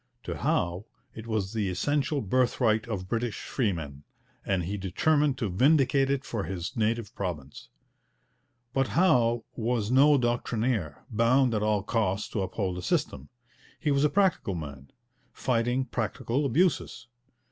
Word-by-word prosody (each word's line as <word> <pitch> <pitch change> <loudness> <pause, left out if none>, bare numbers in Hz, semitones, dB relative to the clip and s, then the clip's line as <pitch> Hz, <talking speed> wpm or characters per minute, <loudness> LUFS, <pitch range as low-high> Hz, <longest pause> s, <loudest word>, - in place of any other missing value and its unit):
To - - -4
Howe 90 +4 0 0.3
it 110 +1 -9
was 110 -3 -2
the 105 -4 -1
essential 145 - 0
birthright 110 0 +1
of 95 -5 -4
British 115 +1 -2
freemen, 80 - -2 0.4
and 95 -3 0
he 95 +5 -3
determined 140 - +1
to 115 - -1
vindicate 135 - +3
it 140 0 -1
for 105 -6 -3
his 90 - -5
native 115 -1 -1
province. 80 - -6 1.0
But 135 0 +1
Howe 120 -10 +3
was 115 -1 -1
no 140 +3 +6
doctrinaire, 120 - -1
bound 120 +3 +3
at 105 - 0
all 105 -2 +1
costs 105 -3 -1
to 105 - -2
uphold 95 -1 -2
a - - -6
system. 70 -5 -2 0.5
He 150 - 0
was 140 0 +2
a 150 - +4
practical 185 - +1
man, 70 -4 -8 0.4
fighting 120 +2 0
practical 120 +4 -2
abuses. 150 -3 0
115 Hz, 140 wpm, -28 LUFS, 95-130 Hz, 1.0 s, no